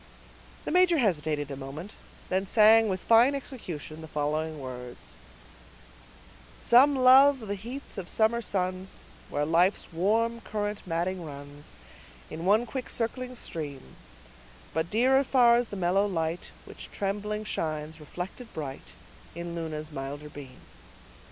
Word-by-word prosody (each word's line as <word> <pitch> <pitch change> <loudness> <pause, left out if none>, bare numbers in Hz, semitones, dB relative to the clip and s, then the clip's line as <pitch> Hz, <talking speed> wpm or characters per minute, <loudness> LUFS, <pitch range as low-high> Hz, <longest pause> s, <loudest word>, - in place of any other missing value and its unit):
The - - -2
major 360 -2 +5
hesitated 155 - 0
a - - -4
moment, 140 +8 -8
and 185 - -5
then 190 - -6
sang, 220 +1 +6
with 190 -1 -2
fine 235 +5 +5
execution, 170 - -7
the 160 - -8
following 155 +1 -2
words:— 125 -2 -8 1.5
Some 270 +4 +5
love 265 +1 +6
the 205 -2 -4
heats 235 +3 -7
of 185 - -7
southern 230 +2 +2
suns, 185 -2 -3 0.3
Where's 145 0 -1
life's 175 +3 +2
warm 225 +7 +1
current 210 -2 -4
maddening 175 +2 -1
runs, 145 -1 -10 0.6
In 165 +2 -5
one 215 +5 +4
quick 255 +2 -5
circling 250 +2 -2
stream; 145 - -6 0.8
But 160 +2 -1
dearer 260 +6 +4
far's 245 -2 +4
the 205 - -7
mellow 190 +3 +2
light 165 -2 -2 0.2
Which - - -8
trembling 210 +2 -2
shines, 155 -5 -3
reflected 180 - -7
bright 140 -4 -7 0.4
In 170 0 -5
Luna's 155 -2 -5
milder 145 +1 -6
beam. 135 -3 -11
185 Hz, 130 wpm, -28 LUFS, 155-230 Hz, 1.5 s, sang